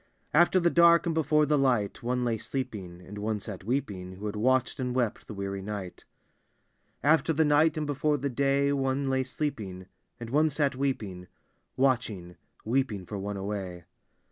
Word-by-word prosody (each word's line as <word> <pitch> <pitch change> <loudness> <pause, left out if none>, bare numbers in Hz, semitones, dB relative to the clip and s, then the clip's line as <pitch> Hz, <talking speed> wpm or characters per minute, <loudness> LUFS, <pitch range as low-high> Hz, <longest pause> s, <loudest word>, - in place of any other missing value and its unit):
After 175 +4 +5
the 170 -1 +2
dark 170 0 +6
and 170 - 0
before 150 -1 +3
the 150 0 +2
l^ht, 120 -7 +1
One 125 +1 -1
lay 115 -1 +1
sleeping, 105 -11 -5
and 105 +3 -9
onfc 105 -1 -2
sat 100 -5 -7
weeping. 100 -6 -3
Who 100 +3 -8
had 105 0 -3
watched 130 +5 +1
and 125 -1 -2
wept 120 -4 -1
the 105 - -7
weaiy 100 0 -4
ni^t. 100 -3 -6 1.0
After 160 +3 +4
the 160 +1 +3
ni^t 155 +1 +3
and 155 - -1
before 145 +1 0
the 140 - -2
day, 140 +2 +2
One 135 0 0
lay 130 0 +2
sleeping; 110 -9 -4 0.3
and 115 -1 -7
one 155 +3 +4
sat 140 -2 0
weeping 105 -10 -3 0.3
— - - -46
Watching, 115 -10 0 0.3
weeping 115 -5 0
for 100 +2 -5
one 100 +1 -4
away. 95 -3 -5
125 Hz, 175 wpm, -28 LUFS, 100-140 Hz, 1.0 s, dark